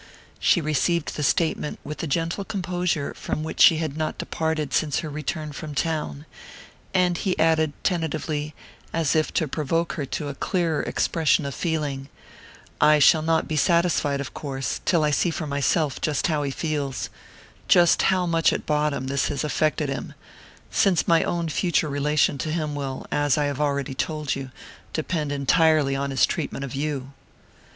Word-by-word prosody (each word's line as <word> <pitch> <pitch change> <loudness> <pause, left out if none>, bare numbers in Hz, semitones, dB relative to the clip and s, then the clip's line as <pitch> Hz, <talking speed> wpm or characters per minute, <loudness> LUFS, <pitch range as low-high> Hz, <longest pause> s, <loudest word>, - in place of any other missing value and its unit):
She 175 - +3
received 155 +2 0
the - - -3
statement 155 0 0
with 150 - -7
the 165 - -3
gentle 165 +6 -1
composure 180 -6 -2
from 155 - -4
which 160 - -3
she 165 - +8
had 155 -3 -3
not 155 0 -2
departed 160 -4 -2
since 145 +2 +1
her 155 - -5
return 155 +1 -4
from 150 0 -7
town; 155 -2 -2 0.7
and 180 -2 +2
he 190 -3 -1
added 160 -1 +2
tentatively, 155 -3 -2 0.4
as 160 -4 +1
if 155 -1 +1
to 160 - +1
provoke 165 +4 -1
her 145 -4 -4
to 150 +3 -4
a 140 - -4
clearer 165 +1 0
expression 160 -3 +1
of 140 - -3
feeling: 145 -5 -2 0.7
"I 150 0 +6
shall 155 +2 +6
not 160 0 +1
be 155 - -2
satisfied, 165 -3 +2
of 140 - -5
course, 135 -3 -4
till 170 -4 +3
I 150 - +2
see 175 - +2
for 160 -1 -3
myself 140 +1 0
just 150 -3 0
how 155 -3 +1
he 140 - -1
feels 140 -2 -3 0.6
just 175 -1 +5
how 185 -1 +2
much, 165 -1 +3
at - - -3
bottom, 150 -3 0
this 135 0 0
has 145 -1 -2
affected 150 +1 0
him 135 - -5 0.6
since 185 -5 +2
my 165 -1 +5
own 170 -1 -1
future 155 +2 +1
relation 145 0 +1
to 155 - -2
him 155 -2 -2
will, 135 -2 -4
as 145 -1 +2
I 150 - +2
have 145 0 -2
already 140 -1 0
told 150 0 -2
you, 135 -1 -5 0.4
depend 155 -2 -2
entirely 145 0 +3
on 140 +1 -2
his 135 -1 +3
treatment 135 - -3
of 130 - -8
you." 140 -1 -3
155 Hz, 175 wpm, -24 LUFS, 140-165 Hz, 0.7 s, she